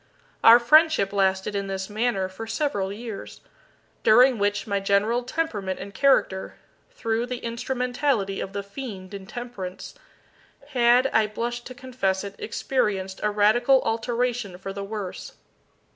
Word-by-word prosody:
Our 230 +1 +10
friendship 305 -5 +4
lasted 190 0 +1
in 200 -1 -2
this 190 0 -4
manner 210 -3 -1
for 190 +4 -8
several 220 -5 -1
years, 220 0 -8 0.6
during 245 +2 +5
which 205 0 0
my 200 -2 -1
general 200 +5 +1
temperament 230 - -3
and 200 - -8
character 260 -9 +2 0.3
through 235 - -2
the 250 0 -4
instrumentality 245 -3 -1
of 195 - -5
the 200 0 -3
Fiend 200 -3 -8
Intemperance 200 -1 -7 0.8
had 245 -2 +4
(I 220 -1 +4
blush 240 +3 -4
to 255 - -9
confess 245 -8 -2
it) 200 -1 -6
experienced 200 -6 -2
a 210 - +1
radical 220 +6 +4
alteration 230 -3 -1
for 195 +1 -7
the 200 0 -5
worse. 200 -2 -6
220 Hz, 135 wpm, -25 LUFS, 195-245 Hz, 0.8 s, Our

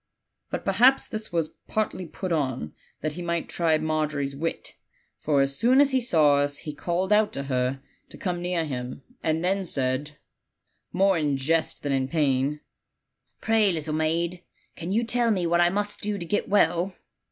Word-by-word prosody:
But - - -4
perhaps 260 +3 +4
this 215 0 -6
was 165 -2 -1
partly 210 -4 -2
put 185 +3 -5
on, 130 - -1 0.3
that 155 - -1
he 170 +4 -7
might 170 -1 -2
try 165 -2 +1
Margery's 155 -3 -1
wit; 165 +4 -4 0.5
for 145 -2 +2
as 135 0 0
soon 245 - +4
as 285 -1 +5
he 260 -1 +2
saw 155 - +4
us 145 0 0
he 150 - -6
called 180 +6 0
out 210 0 +4
to 140 - -3
her 130 0 -1 0.3
to - - -11
come 180 -2 -3
near 175 -2 -1
him, 130 -2 -5 0.2
and 160 +2 0
then 195 +1 +1
said* 140 -2 -1 0.7
more 190 -1 +3
in 145 -3 0
jest 160 +4 0
than 145 - -1
in 135 -1 +1
pain, 145 -1 +1 0.8
'Pray 220 -3 +3
little 155 -2 -3
maid, 170 +3 -1 0.3
can 170 +2 -5
you 225 +4 +2
tell 235 0 +1
me 190 -5 +1
what 170 +1 +3
I 175 - +5
must 205 +2 -2
do 210 0 -2
to 175 - -5
get 205 +5 -1
well?' 180 -1 +2
165 Hz, 180 wpm, -26 LUFS, 145-190 Hz, 0.8 s, as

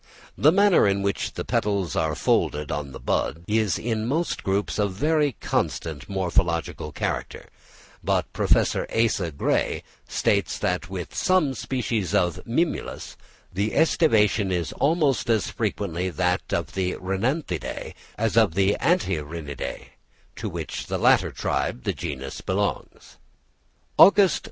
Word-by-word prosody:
The 150 - +5
manner 200 - +5
in 100 0 +1
which 100 -1 -1
the - - -5
petals 100 -5 0
are 80 -2 0
folded 75 0 0
in 75 -1 -3
the - - -9
bud 85 +4 -1
is 105 -5 +1
in 110 -1 -2
most 160 +7 -1
groups 100 +2 -1
a 105 - +3
very 145 +8 +1
constant 75 -6 -2
morphological 85 -4 -1
character; - - -4 0.5
but - - 0
Professor - - +2
Asa 110 -7 +1
Gray 70 - 0 0.2
states - - 0
that - - -1
with - - -6
some 185 -7 +2
species 115 -8 -2
of 90 -2 +1
Mimulus, 160 +9 -2 0.4
the 100 +4 -1
æstivation 110 - +3
is 85 -3 -1
almost 145 -5 +1
as 110 -2 +1
frequently 95 -5 -2
that 90 +2 -1
of 80 -3 -2
the 95 -1 -1
Rhinanthideæ 95 - -3 0.2
as 115 0 0
of 110 -8 +4
the 100 +1 +2
Antirrhinideæ, 80 - -2 0.5
to - - -4
which - - -5
latter - - +3
tribe 60 - -2
the - - 0
genus 70 -5 -6
belongs. 100 +2 -3 0.8
Aug. 200 - +9
St. 160 - -2
100 Hz, 130 wpm, -24 LUFS, 85-120 Hz, 0.8 s, Aug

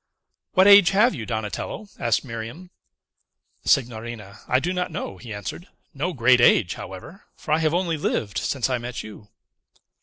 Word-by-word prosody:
"What 185 -1 +5
age 200 -2 +8
have 235 +5 +5
you, 115 -9 -6
Donatello?" 110 - -4
asked 115 +3 +1
Miriam. 120 +10 -8 0.9
"Signorina, 115 -5 -1
I 130 - +3
do 175 +6 -2
not 180 0 -2
know," 95 - -6
he 120 - -10
answered; 105 - -6 0.3
"no 165 +6 -2
great 125 -4 +4
age, 90 -6 +4
however; 95 - -10
for - - -8
I 155 - +4
have 160 0 +1
only 175 -3 0
lived 110 -7 -2
since 130 0 -1
I 130 -2 -1
met 125 +1 -6
you." 105 -1 -12
125 Hz, 160 wpm, -23 LUFS, 110-170 Hz, 0.9 s, age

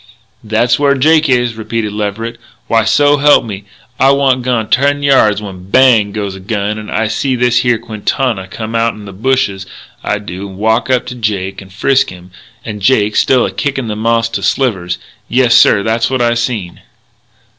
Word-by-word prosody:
"That's 110 +4 +1
where 140 -1 +3
Jake 155 +3 +3
is," 120 -2 +1
repeated 110 -1 -4
Leverett. 110 +3 -4 0.3
"Why, 115 -1 +1
so 145 +4 +3
help 145 -3 +4
me, 100 -2 -7 0.3
I 135 - +4
wa'nt 135 -2 +2
gone 120 -3 -1
ten 140 +2 +1
yards 110 -7 +3
when, 95 -2 -10
bang! 115 -4 +4
goes 100 -2 -4
a 95 - -9
gun, 105 +2 -3
and 105 - -9
I 110 0 -1
see 130 +4 -1
this 125 0 +2
here 120 -2 +1
Quintana 110 -1 -3
come 110 +3 -7
outen 115 -2 -1
the 100 - -10
bush, 130 +7 +1 0.6
I 105 - -1
do, 100 -1 -7
and 95 - -11
walk 110 +4 0
up 130 -2 +1
to 125 - -6
Jake 100 -5 -3
and 95 -1 -14
frisk 130 +7 +1
him, 90 0 -13 0.3
and 105 -1 -6
Jake 105 -2 +2
still 130 -2 +3
a - - -3
kickin' 135 -5 -3
the 105 - -3
moss 115 +1 +1
to 115 - -4
slivers. 95 -10 -1 0.3
Yessir, 120 -5 +4
that's 115 +1 0
what 130 -1 -1
I 120 0 +2
seen." 115 -7 -3
115 Hz, 185 wpm, -13 LUFS, 105-130 Hz, 0.6 s, help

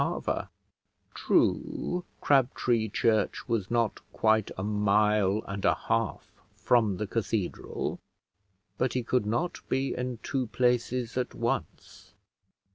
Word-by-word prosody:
True, 180 0 +1 0.2
Crabtree 120 -4 +2
Church 110 +1 +1
was 115 -6 -1
not 115 -2 +1
quite 110 -1 +2
a 95 - -3
mile 105 0 +2
and 100 0 -5
a - - +4
half - - -2
from 110 -6 +2
the 105 - -2
cathedral; 105 -2 -2 0.8
but 130 - +1
he 125 - -1
could 120 -2 0
not 170 +11 -1
be 135 +1 0
in 125 -1 -3
two 130 -3 -1
places 125 +1 0
at 125 - -3
once. - - -4
115 Hz, 115 wpm, -28 LUFS, 105-125 Hz, 0.8 s, a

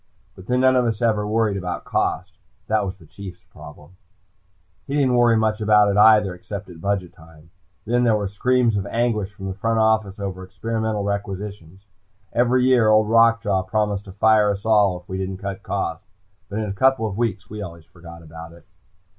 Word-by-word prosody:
But 95 - -14
then 125 0 +1
none 130 0 +4
of 125 -1 +3
us 115 -3 -1
ever 105 -3 +1
worried 105 -2 0
about 90 -2 -5
cost. - - -2 0.3
That 110 -1 +1
was 95 0 -4
the 85 - -18
Chief's 95 +2 -11
problem. 75 +4 -15 0.9
He 140 - -3
didn't 135 -3 +2
worry 120 -2 +4
much 110 0 0
about 105 -1 +4
it 100 - -1
either, 105 -3 +5
except 100 +2 -8
at 80 -2 -13
budget 100 -2 -2
time. 80 -2 -18 0.3
Then 120 +2 +1
there 115 -3 +3
were 105 -1 -1
screams 120 +3 +1
of 100 0 -3
anguish 110 -3 -1
from 95 -1 -10
the 95 - -3
front 115 +4 -1
office 110 -3 +1
over 95 -2 -5
experimental 110 +2 -3
requisitions. 100 -2 -5 0.5
Every 125 +1 +2
year, 125 -4 +4
Old 110 0 +4
Rock 115 0 +4
Jaw 100 -3 +1
promised 105 +1 -2
to 95 - -10
fire 105 +1 +3
us 100 +1 -3
all, 105 -5 +3
if 90 - -31
we 95 0 -5
didn't 95 0 -4
cut 100 0 -6
costs, 95 -2 -4 0.4
but 100 - -5
in 110 - -1
a 100 - -3
couple 130 +2 +2
of 105 -3 -4
weeks 105 -4 -2
we 105 0 -7
always 85 -4 -9
forgot 85 0 -13
about 80 +1 -11
it. 85 -1 -18
105 Hz, 200 wpm, -22 LUFS, 95-110 Hz, 0.9 s, either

